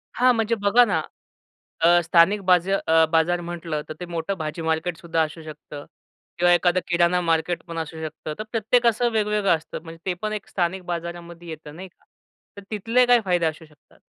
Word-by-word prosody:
हां, 250 0 +4
म्हणजे 225 +1 0
बघा 210 +4 +4
ना, 195 -7 0 0.8
अ, 175 +1 +5
स्थानिक 175 +5 +4
बाज 180 0 +3
अ, 160 -4 +3
बाजार 170 +2 +2
म्हटलं, 170 -3 -4
तर - - -4
ते 180 - -5
मोठं 170 +2 -3
भाजी 155 +1 -5
मार्केट 160 +1 -1
सुद्धा 165 -3 -1
असू 155 +1 -6
शकतं. 150 -1 -10 0.5
किंवा 175 0 +4
एखादं 175 +1 +3
किराणा 175 0 +2
मार्केट 165 +1 0
पण 165 -1 -7
असू 160 0 -6
शकतं. 155 0 -6
तर - - -2
प्रत्येकाचं 235 +1 +2
वेगवेगळं 210 -4 +2
असतं 155 - -9
म्हणजे 165 0 -11
ते 185 - 0
पण 215 0 -2
एक 210 - -6
स्थानिक 180 0 -2
बाजारामध्ये 170 0 -6
येतं, 155 -1 -9
नाही 185 +3 -9
का. - - -36 0.5
तर - - -8
तिथले 230 +4 +2
काय 245 -1 +5
फायदे 175 -3 +1
असू 160 +1 -3
शकतात? 150 -2 -25
175 Hz, 185 wpm, -23 LUFS, 165-200 Hz, 0.8 s, अ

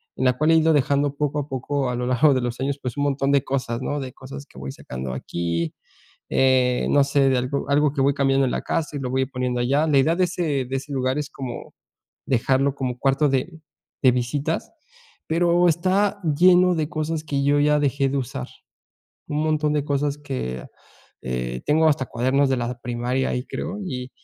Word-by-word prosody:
en 130 - -1
la 125 -1 +3
cual 155 +3 +3
he - - +6
ido 160 0 +4
dejando 140 0 +1
poco 150 0 -1
a 145 - -4
poco 135 0 -2
a 125 - -2
lo 125 0 -2
largo 130 +3 +4
de 130 - +1
los 120 0 -3
años, 135 +1 -1
pues 125 0 -4
un 145 - 0
montón 140 -1 +1
de 140 -2 +3
cosas, 125 -3 -2
¿no?, 145 +2 -2
de 130 -2 -6
cosas 140 +2 -9
que - - -19
voy 65 +1 -6
sacando 65 0 -6
aquí, 85 +4 -3 0.5
eh, 130 -1 +2
no 145 - +5
sé, 140 0 +2
de 130 - +2
algo 130 +3 -2
algo 145 +1 +3
que 145 - -4
voy 140 +1 +3
cambiando 135 -1 +2
en 125 - -1
la - - -2
casa 155 -2 -2
y - - -3
lo 130 -2 -3
voy 130 +1 +1
poniendo 125 -2 -2
allá. 140 +6 +2
La 145 -3 +3
idea 155 +5 +3
de 185 - +2
ese 165 -6 -1
de 130 +2 -4
ese 140 +2 -7
lugar 130 0 0
es 150 -1 -3
como 130 -5 -7 0.5
dejarlo 135 +2 +1
como 125 -3 -3
cuarto 135 +3 +2
de 140 +5 -2 0.4
de 130 - +7
visitas, 140 +6 -2 0.6
pero 175 +2 +3
está 190 +5 +1 0.2
lleno 180 +2 +5
de 155 -3 -1
cosas 155 -1 -3
que 140 -2 -1
yo 145 +1 +3
ya 150 0 +3
dejé 140 -1 +1
de 135 - -2
usar. 120 - -5 0.8
Un 150 +1 -1
montón 155 -1 +1
de 150 -2 0
cosas 145 0 -1
que, 130 - -5 0.6
eh 60 -1 -3
tengo 160 +2 +3
hasta 140 -3 +1
cuadernos 130 +4 +1
de 130 - +2
la 120 0 -3
primaria 125 +2 -1
ahí, 125 - -2
creo, 195 +5 -5
y 125 -5 -5
140 Hz, 210 wpm, -23 LUFS, 125-150 Hz, 0.8 s, de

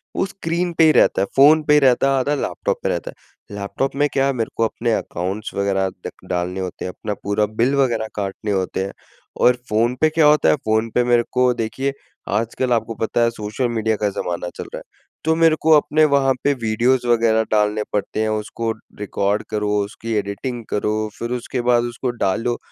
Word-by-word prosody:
वो - - +1
स्क्रीन 175 -2 -2
पे 165 - +6
ही 155 - +6
रहता 95 - +3
है - - +2
फ़ोन 150 +3 +6
पे 150 0 +5
रहता 135 -1 +4
है, 135 - +2
आधा 145 +3 0
लैपटॉप - - -2
पे - - 0
रहता - - -3
है। 100 - -17
लैपटॉप 135 +7 -3
में 145 +1 +2
क्या 135 0 +2
मेरे 115 -3 -2
को 115 - +2
अपने 115 +1 -1
अकाउंट्स 95 +5 -3
वगैरह 95 -1 0 0.2
द - - -4 0.2
डालने 90 +1 -2
होते 90 -1 -5
हैं, 90 - -3
अपना 105 +3 -5
पूरा 100 +1 +1
बिल 115 +6 0
वगैरह 120 -5 +1
काटने 100 +1 -3
होते 95 -1 -1
हैं 100 - -6 0.5
और 125 0 +5
फ़ोन 115 +3 +1
पे 155 - +5
क्या 160 0 +3
होता 150 0 +4
है - - +5
फ़ोन 110 -3 0
पे 125 - +4
मेरे 120 -1 +3
को 125 -1 +3
देखिए, 130 +4 -2 0.4
आजकल 115 +4 0
आपको 115 -1 -1
पता 115 +1 0
है 115 - +3
सोशल 110 +3 -3
मीडिया 110 -1 0
का 105 - +3
ज़माना 90 -3 -4
चल - - -5
रहा - - -4
है, - - -9 0.4
तो 160 +1 +2
मेरे 165 -1 +4
को 160 - +3
अपने 155 +1 +3
वहाँ 135 -1 +3
पे 145 - +3
वीडियोज़ 120 +1 +1
वगैरह 115 -1 +3
डालने 105 0 +2
पड़ते 105 +1 -1
हैं 110 - 0
उसको 110 +2 -2 0.3
रिकॉर्ड 100 0 -1
करो, 105 -1 -1
उसकी 115 +3 -6
एडिटिंग 105 +4 -3
करो 105 +1 -1
फिर 120 +1 -4
उसके 125 0 -3
बाद 120 -1 +3
उसको 120 +2 -3 0.2
डालो 115 +5 0
115 Hz, 205 wpm, -20 LUFS, 105-135 Hz, 0.5 s, पे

